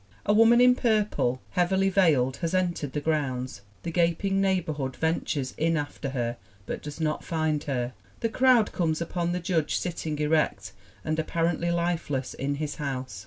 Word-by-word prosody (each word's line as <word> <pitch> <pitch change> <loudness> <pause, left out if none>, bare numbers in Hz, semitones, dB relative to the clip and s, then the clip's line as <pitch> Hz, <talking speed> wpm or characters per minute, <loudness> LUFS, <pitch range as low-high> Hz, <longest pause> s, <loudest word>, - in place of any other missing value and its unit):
A 205 - +3
woman 225 +2 +6
in 250 0 +7
purple, 210 - +1
heavily 190 +2 +2
veiled, 150 -10 +3
has 170 +1 -2
entered 175 -7 -1
the 150 - 0
grounds. 130 -7 -2 0.2
The 170 - -3
gaping 175 +3 +1
neighbor 190 -5 +1
hood 135 -3 -4
ventures 160 -4 -1
in 165 +1 +2
after 145 -1 -4
her 120 -3 -2 0.3
but - - -4
does 150 +1 -8
not 155 -1 -1
find 155 -2 -1
her. 125 -3 -2 0.3
The 230 - +1
crowd 250 -2 +4
comes 160 -3 0
upon 170 +1 -2
the 180 - -1
Judge 170 -3 0
sitting 165 -3 -3
erect 150 +1 0 0.3
and 155 0 -1
appar 165 +1 0
ently 170 +2 -1
lifeless 170 -6 -1
in 140 +1 -2
his 150 0 -4
house 130 -7 -4
160 Hz, 170 wpm, -27 LUFS, 145-180 Hz, 0.3 s, in